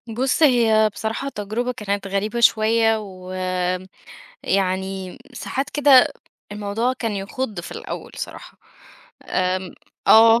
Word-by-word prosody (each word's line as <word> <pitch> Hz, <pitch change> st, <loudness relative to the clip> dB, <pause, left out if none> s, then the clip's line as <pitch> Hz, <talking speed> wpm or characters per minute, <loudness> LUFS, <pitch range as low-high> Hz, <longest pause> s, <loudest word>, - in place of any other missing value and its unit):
بُص 255 Hz, +7 st, 0 dB
هي 225 Hz, -6 st, +5 dB
بصراحة 225 Hz, +7 st, -3 dB
تجربة 220 Hz, +2 st, -3 dB
كانت 200 Hz, -3 st, -3 dB
غريبة 205 Hz, +4 st, -2 dB
شوية، 225 Hz, 0 st, +4 dB
ويعني 185 Hz, -1 st, -4 dB, 1.3 s
ساعات 265 Hz, +3 st, -4 dB
كده 280 Hz, -3 st, +6 dB, 0.4 s
الموضوع 210 Hz, +4 st, -1 dB
كان 230 Hz, -4 st, -3 dB
يخُض 205 Hz, +1 st, -4 dB
في 175 Hz, -, -9 dB
الأول -, -, -7 dB
صراحة، -, -, -8 dB, 0.7 s
آمم، 185 Hz, 0 st, -1 dB, 0.3 s
آه. 225 Hz, +1 st, +7 dB
220 Hz, 105 wpm, -22 LUFS, 195-235 Hz, 1.3 s, آه